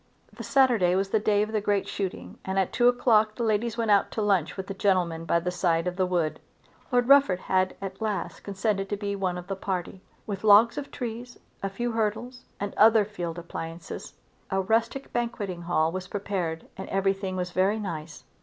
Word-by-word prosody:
The - - -9
Saturday 245 -10 +3
was 195 +1 0
the 220 - +3
day 210 0 +2
of 215 - -4
the 215 -1 0
great 205 -1 0
shooting 195 -3 -5
and 190 0 -3
at 190 -2 +1
two 245 - +4
o'clock 220 -3 +3
the 240 - -3
ladies 225 +1 0
went 225 -2 +1
out 200 -1 +4
to 220 - -2
lunch 195 -5 +1
with 190 - -4
the 195 - -5
gentlemen 180 -4 +1
by 170 +1 +2
the 180 +1 -2
side 170 -2 +1
of 180 0 -2
the 185 0 +1
wood. 165 -4 0 0.5
Lord 245 -1 +2
Rufford 275 -10 +5
had 185 0 +1
at 190 +2 -6
last 215 -2 -2
consented 195 0 -2
to 205 - -2
be 200 0 -3
one 185 -2 -1
of 180 - -7
the 195 - -3
party. 185 -1 -4 0.2
With 200 -1 -5
logs 220 +5 +6
of 285 - -7
trees, 240 -1 -6 0.2
a 195 - -1
few 240 +5 -3
hurdles, 225 +3 -2
and 200 0 -3
other 220 -1 +6
field 175 -5 -5
appliances, 165 0 -7 0.4
a 190 - 0
rustic 225 +7 0
banqueting 210 -7 -3
hall 165 -2 +1
was 185 +1 -5
prepared 185 -5 -3
and 190 - -7
everything 195 0 0
was 180 -1 -3
very 190 +4 +2
nice. 165 -6 -6
195 Hz, 200 wpm, -27 LUFS, 180-220 Hz, 0.5 s, logs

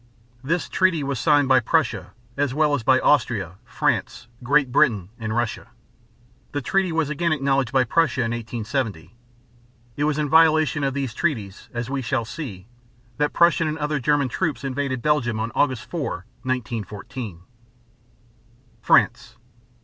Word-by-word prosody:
This 165 +6 -1
treaty 185 -5 +1
was 135 -3 -2
signed 145 +1 +3
by 130 -1 +5
Prussia 155 0 0 0.2
as 140 -2 -1
well 150 -1 +2
as 145 - 0
by 130 +3 +4
Austria, 100 - +1
France, 120 - -2
Great 135 +1 +2
Britain, 115 -10 +2
and 110 -1 -3
Russia. 120 -1 -2 0.9
The 145 - -1
treaty 190 +2 +1
was 160 -2 0
again 170 +3 0
acknowledged 135 -4 +1
by 130 -1 +3
Prussia 155 +3 +1
in 115 - -1
1870. 115 - -4 0.8
It 145 - -1
was 150 -1 0
in 150 -1 0
violation 155 -1 +4
of 135 -1 -1
these 135 -5 -2
treaties, 110 - -3
as 120 -1 -4
we 140 -1 -1
shall 120 -1 -1
see, 110 - -7 0.5
that 150 0 +1
Prussian 170 -1 +3
and 155 +1 -2
other 150 -1 -1
German 145 +1 +2
troops 145 -1 -2
invaded 135 -2 -2
Belgium 130 -7 +1
on 115 +1 -2
August 130 -5 0
4, 145 - -4 0.2
1914. 115 -4 -5 1.4
FRANCE. - - +2
135 Hz, 150 wpm, -23 LUFS, 120-150 Hz, 1.4 s, by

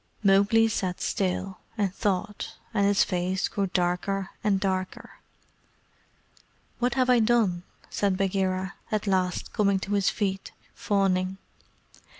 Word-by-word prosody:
Mowgli 200 +3 +5
sat 185 -5 -2
still, 190 0 -2 0.2
and 200 -3 0
thought, 205 0 -2 0.2
and 200 -2 +3
his 200 0 +4
face 185 +1 -1
grew 200 -1 -1
darker 185 +2 -1
and 205 -2 +2
darker. 185 -1 -3 1.6
"What 245 0 +1
have 255 -1 +2
I 250 -1 +5
done?" 220 -6 +2 0.3
said 200 -2 0
Bagheera, 190 0 0 0.2
at 215 -1 0
last 185 -2 0
coming 200 -3 +2
to 200 - -3
his 200 -1 +3
feet, 195 -3 -2 0.2
fawning. 190 -2 0
195 Hz, 125 wpm, -27 LUFS, 185-205 Hz, 1.6 s, Mowgli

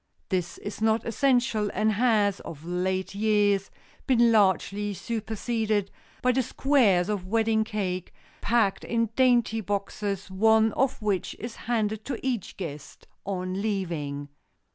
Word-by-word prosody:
This 180 -3 -2
is 205 +1 -7
not 220 0 +2
essential 235 -3 +1
and 215 +1 +2
has, 210 -3 +2
of 155 0 -9
late 185 +2 -1
years, 205 -2 +2 0.4
been 240 -3 +5
largely 205 -1 +2
superseded 220 0 -2 0.3
by 250 - +4
the 260 +1 +2
squares 225 -9 +2
of 200 -3 -3
wedding 220 +1 +2
cake, 190 -5 -3 0.3
packed 225 -4 +1
in 230 -1 0
dainty 240 -3 +3
boxes, 200 -1 -3
one 220 +3 +4
of 265 -4 0
which 200 -3 -1
is 230 0 -7
handed 220 -2 -1
to 265 -4 -3
each 245 -7 -2
guest 150 -6 -8 0.2
on 185 0 -2
leaving. 165 -9 -3
210 Hz, 130 wpm, -27 LUFS, 190-230 Hz, 0.4 s, been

